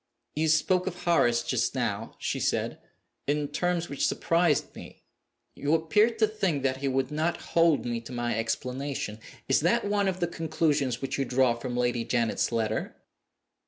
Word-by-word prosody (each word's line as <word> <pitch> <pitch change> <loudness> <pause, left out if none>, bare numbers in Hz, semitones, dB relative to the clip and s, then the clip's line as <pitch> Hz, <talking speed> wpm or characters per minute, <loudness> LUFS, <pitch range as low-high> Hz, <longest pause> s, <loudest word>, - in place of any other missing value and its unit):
"You 155 +2 +1
spoke 180 +4 +2
of 180 -1 -5
Horace 120 -9 +3
just - - 0
now," - - -2
she - - -2
said, - - -1 0.5
"in 145 0 0
terms 175 +2 -1
which 140 - 0
surprised 170 +1 +1
me. - - -12 0.5
You 145 +3 +1
appeared 210 +8 +2
to 220 -1 +4
think 195 -10 -1
that 130 -1 +1
he 135 +1 -2
would 135 0 0
not 160 +3 0 0.2
hold 165 -3 +4
me 120 -1 -2
to 115 - -11
my 120 -2 -1
explanation. 125 0 -3 0.3
Is 135 - +4
that 185 +9 +2
one 205 -1 +1
of 185 -1 -1
the 175 - +2
conclusions 155 -6 -1
which 135 - -2
you 135 - +1
draw 125 -1 +3
from 120 +1 -5
Lady 120 -1 +1
Janet's 115 -1 0
letter?" 110 -1 -1
145 Hz, 170 wpm, -28 LUFS, 125-170 Hz, 0.5 s, to